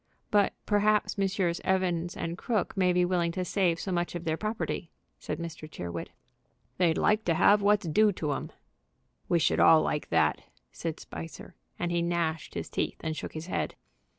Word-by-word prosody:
"But 205 -2 +3
perhaps 210 0 +2
Messrs. 190 -3 0
Evans 180 -2 0
& 170 +1 -5
Crooke 220 -5 -1
may 185 -2 +3
be 180 0 +3
willing 175 -2 +1
to 185 0 -2
save 175 -3 +1
so 190 - -4
much 175 0 -1
of 175 - -4
their 160 -2 0
property," 215 -3 -3 0.3
said - - -4
Mr. 165 -2 -7
Tyrrwhit. 85 - -5 0.7
"They'd 170 -3 +3
like 210 +1 +3
to 170 - +2
have 205 +5 +5
what's 205 -2 +3
due 210 +7 +4
to 150 -5 -2
'em." - - -5 0.8
"We 175 - +4
should 165 - +2
all 160 -1 +7
like 150 - -2
that," 80 -4 +2 0.3
said 165 -2 -4
Spicer, 165 +3 -9 0.2
and 175 0 -2
he 170 0 +1
gnashed 170 -2 -1
his - - -3
teeth - - -2
and 160 -1 -2
shook - - -6
his 155 +1 -6
head. 180 - -2
175 Hz, 180 wpm, -29 LUFS, 165-195 Hz, 0.8 s, all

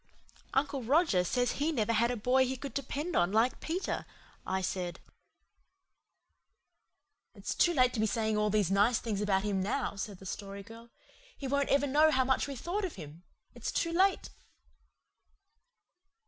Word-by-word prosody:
"Uncle 275 0 +1
Roger 255 - +3
says 245 +7 0
he 300 +3 -1
never 230 -6 0
had 235 +2 +3
a 245 - -1
boy 250 +4 +3
he 260 0 -2
could 275 +2 -7
depend 290 +5 -3
on 175 +2 +3
like 225 +4 +2
Peter," 350 +4 -3 0.4
I 190 0 0
said. 180 -1 -3 2.4
"It's - - -4
too 345 - +3
late 255 -6 +3
to 230 - -3
be 220 - +2
saying 220 0 0
all 210 0 +1
these 205 -3 +1
nice 205 +4 +4
things 210 -4 -3
about 195 -2 +1
him 200 -2 0
now," 210 +4 -1
said 200 0 -5
the 190 - -14
Story 200 +1 -6
Girl. 230 +3 -13 0.5
"He 275 - -5
won't 280 +1 0
ever 280 0 +3
know 300 +3 +4
how 260 -4 +3
much 265 +1 +1
we 280 - -5
thought 350 - -3
of 370 - -3
him. 160 -2 -10 0.3
It's - - -4
too 335 - 0
late." 380 +3 +2
235 Hz, 170 wpm, -31 LUFS, 205-280 Hz, 2.4 s, nice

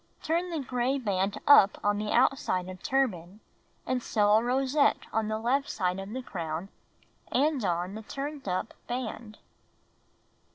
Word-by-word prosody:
Turn 340 +3 0
the 335 - -3
gray 255 0 -1
band 200 -5 -1
up 210 -8 +7
on 205 0 +1
the 210 0 -2
outside 235 -8 +2
of 185 -1 -9
turban 210 -8 -1 0.5
and 255 -1 -1
sew 210 -3 +2
a 225 - +1
rosette 265 +4 +2
on 220 -1 0
the 215 0 -1
left 260 +5 0
side 185 -2 -1
of 195 +1 -6
the 255 +4 -5
crown 170 -2 -5 0.6
and 285 -1 +2
on 175 0 -1
the 220 - -6
turned 275 +3 -6
up 185 +4 -2
band. 230 -3 -5
220 Hz, 155 wpm, -28 LUFS, 195-265 Hz, 0.6 s, up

